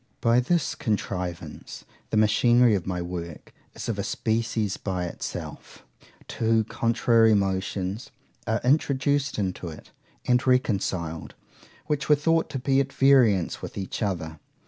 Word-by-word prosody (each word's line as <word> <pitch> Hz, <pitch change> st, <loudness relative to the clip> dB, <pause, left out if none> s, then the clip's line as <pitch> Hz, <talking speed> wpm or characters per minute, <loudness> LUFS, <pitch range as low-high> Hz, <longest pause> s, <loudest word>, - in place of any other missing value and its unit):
By 115 Hz, +1 st, +3 dB
this 160 Hz, +5 st, 0 dB
contrivance 90 Hz, -, -4 dB, 0.2 s
the -, -, 0 dB
machinery 120 Hz, +2 st, +4 dB
of 95 Hz, -4 st, -1 dB
my 90 Hz, -2 st, -2 dB
work 85 Hz, -2 st, -7 dB, 0.2 s
is -, -, -6 dB
of -, -, -2 dB
a -, -, -1 dB
species 110 Hz, -2 st, -1 dB
by 90 Hz, -3 st, -3 dB
itself; 85 Hz, -, -7 dB, 0.4 s
two 115 Hz, -1 st, +1 dB
contrary 115 Hz, 0 st, +3 dB
motions 95 Hz, +2 st, -2 dB, 0.4 s
are 110 Hz, 0 st, 0 dB
introduced 140 Hz, +1 st, +1 dB
into 95 Hz, -3 st, -3 dB
it, 80 Hz, -2 st, -10 dB, 0.3 s
and 125 Hz, +1 st, +2 dB
reconciled, 95 Hz, -10 st, 0 dB, 0.5 s
which 145 Hz, -1 st, -2 dB
were 150 Hz, -, +7 dB
thought 165 Hz, +3 st, +1 dB
to -, -, -4 dB
be 135 Hz, +1 st, +1 dB
at 135 Hz, 0 st, -1 dB
variance 125 Hz, -11 st, +3 dB
with -, -, -8 dB
each 95 Hz, +3 st, -5 dB
other. 80 Hz, -7 st, -3 dB
110 Hz, 135 wpm, -25 LUFS, 95-125 Hz, 0.5 s, were